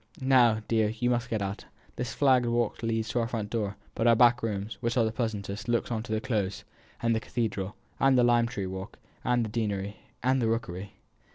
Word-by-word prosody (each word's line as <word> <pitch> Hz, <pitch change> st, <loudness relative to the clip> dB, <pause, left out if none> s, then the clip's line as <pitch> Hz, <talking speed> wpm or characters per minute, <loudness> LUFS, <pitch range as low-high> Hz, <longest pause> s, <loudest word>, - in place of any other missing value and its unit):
Now, 125 Hz, -5 st, +4 dB
dear, 110 Hz, -2 st, +2 dB
you 120 Hz, +3 st, 0 dB
must 120 Hz, 0 st, 0 dB
get 110 Hz, -3 st, -1 dB
out. 100 Hz, +1 st, -4 dB, 0.3 s
This 125 Hz, 0 st, -3 dB
flagged 130 Hz, -4 st, +4 dB
walk 120 Hz, -2 st, 0 dB
leads 115 Hz, -1 st, -1 dB
to 120 Hz, -, 0 dB
our 115 Hz, -, 0 dB
front 110 Hz, -3 st, -4 dB
door; 105 Hz, -3 st, -1 dB, 0.2 s
but 115 Hz, -, +1 dB
our 115 Hz, -, +7 dB
back 120 Hz, +1 st, +5 dB
rooms, 105 Hz, -1 st, -3 dB
which 115 Hz, 0 st, -1 dB
are 115 Hz, -, +4 dB
the 110 Hz, -, 0 dB
pleasantest, 105 Hz, -2 st, -3 dB
look 120 Hz, 0 st, 0 dB
on 110 Hz, -2 st, -1 dB
to 110 Hz, -, -8 dB
the 110 Hz, -, +1 dB
Close, 105 Hz, -5 st, -2 dB, 0.4 s
and 115 Hz, -1 st, +3 dB
the -, -, +1 dB
cathedral, 105 Hz, -5 st, -3 dB, 0.2 s
and 135 Hz, -1 st, +5 dB
the 125 Hz, -, +5 dB
lime 120 Hz, -1 st, +4 dB
tree 100 Hz, -5 st, -4 dB
walk, 95 Hz, +2 st, -6 dB, 0.3 s
and 120 Hz, -2 st, +2 dB
the -, -, -5 dB
deanery, 105 Hz, -2 st, -2 dB, 0.3 s
and 130 Hz, +1 st, +3 dB
the 115 Hz, -, +2 dB
rookery." 100 Hz, -4 st, -3 dB
115 Hz, 215 wpm, -28 LUFS, 105-120 Hz, 0.4 s, our